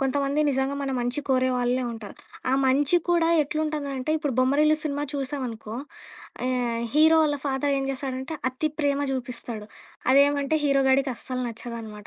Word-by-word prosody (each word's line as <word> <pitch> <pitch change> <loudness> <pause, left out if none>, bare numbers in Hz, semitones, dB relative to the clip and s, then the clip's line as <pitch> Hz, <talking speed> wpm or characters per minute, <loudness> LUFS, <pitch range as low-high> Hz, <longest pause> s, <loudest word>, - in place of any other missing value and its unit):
కొంతమంది 275 +2 +1
నిజంగా 265 0 0
మన 275 - -2
మంచి 245 +3 -1
కోరే 255 -1 +3
వాళ్ళే 245 +1 +1
ఉంటారు. 220 -3 -9 0.4
ఆ - - +2
మంచి 280 +5 +3
కూడా 340 -1 +3
ఎట్లుంటుందంటే 295 -2 -2
ఇప్పుడు 295 -3 -2
బొమ్మరిల్లు 290 +4 +4
సినిమా 290 -1 -2
చూసామనుకో. 255 -6 -4 0.7
ఆహ్, 245 -2 0
హీరో 315 +2 +6
వాళ్ళ 295 -2 +1
ఫాదరేం 275 0 0
చేస్తాడంటే, 265 +2 -4
అతి 260 +5 -1
ప్రేమ 285 -2 +1
జూపిస్తాడు. 240 -4 -5 0.5
అదేమంటే, 285 +1 +4
హీరో 275 -1 +3
గాడికస్సలు 265 -1 0
నచ్చదనమాట. 225 -3 -8
270 Hz, 135 wpm, -25 LUFS, 255-290 Hz, 0.7 s, హీరో